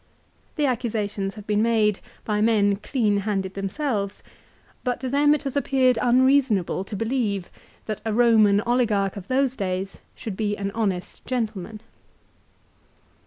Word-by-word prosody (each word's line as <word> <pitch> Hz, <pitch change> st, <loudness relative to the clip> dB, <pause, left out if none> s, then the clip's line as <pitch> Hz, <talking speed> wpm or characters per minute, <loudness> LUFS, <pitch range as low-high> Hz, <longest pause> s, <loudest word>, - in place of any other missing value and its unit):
The 300 Hz, -, +1 dB
accusations 215 Hz, -6 st, -2 dB
have 210 Hz, -2 st, -10 dB
been 210 Hz, 0 st, +1 dB
made 220 Hz, -3 st, +2 dB, 0.3 s
by 210 Hz, -1 st, 0 dB
men 205 Hz, -3 st, +3 dB
clean 215 Hz, -2 st, 0 dB
handed 195 Hz, -2 st, -2 dB
themselves; 200 Hz, +1 st, -3 dB, 0.6 s
but 250 Hz, -1 st, -1 dB
to 260 Hz, -, -2 dB
them 290 Hz, +2 st, +4 dB
it 300 Hz, -, -5 dB
has 275 Hz, -1 st, -4 dB
appeared 260 Hz, -4 st, +2 dB
unreasonable 250 Hz, -7 st, +3 dB
to 205 Hz, -, -6 dB
believe 220 Hz, -4 st, -1 dB, 0.3 s
that 215 Hz, -2 st, -4 dB
a 220 Hz, -, -2 dB
Roman 215 Hz, -3 st, +4 dB
oligarch 220 Hz, -5 st, +1 dB
of 195 Hz, -2 st, -8 dB
those 265 Hz, 0 st, +1 dB
days 190 Hz, -1 st, -3 dB, 0.2 s
should 215 Hz, -4 st, -6 dB
be 210 Hz, 0 st, -1 dB
an 200 Hz, 0 st, -3 dB
honest 195 Hz, -5 st, -3 dB
gentleman. 220 Hz, -4 st, -3 dB
215 Hz, 140 wpm, -24 LUFS, 200-250 Hz, 0.6 s, them